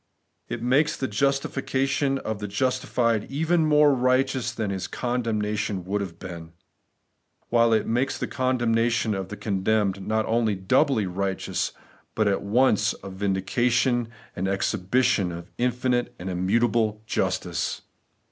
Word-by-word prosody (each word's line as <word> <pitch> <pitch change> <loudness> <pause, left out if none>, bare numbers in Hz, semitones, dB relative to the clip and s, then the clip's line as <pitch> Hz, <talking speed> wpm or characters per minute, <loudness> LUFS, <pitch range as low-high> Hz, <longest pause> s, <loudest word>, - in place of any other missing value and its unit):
It 115 - -4
makes 145 +5 +2
the 130 - -2
justification 135 +2 0
of 110 -5 -4
the 105 - -4
justified 115 0 0
even 160 +3 +1
more 150 -1 +5
righteous 130 -1 +1
than 110 -4 -3
his 95 -1 -3
condemnation 105 -6 -2
would 100 +2 -1
have 85 -4 -6
been; 85 -2 -9 1.0
while 115 -1 +4
it 110 -1 +2
makes 125 +4 0
the - - -2
condemnation 120 -3 +1
of 95 -1 -4
the 105 - -7
condemned 100 -1 0
not 110 0 +1
only 115 -2 +1
doubly 110 +5 +2
righteous, 95 +1 -2 0.4
but 110 -1 +2
at 100 -1 +1
once 110 +1 +2
a 95 - -7
vindication 120 +6 +1 0.3
and 95 +2 -2
an 95 - +1
exhibition 95 -1 +1
of 85 0 -8
infinite 125 0 0
and 95 +2 -5
immutable 110 +3 +1
justice. - - -2
115 Hz, 135 wpm, -25 LUFS, 100-125 Hz, 1.0 s, more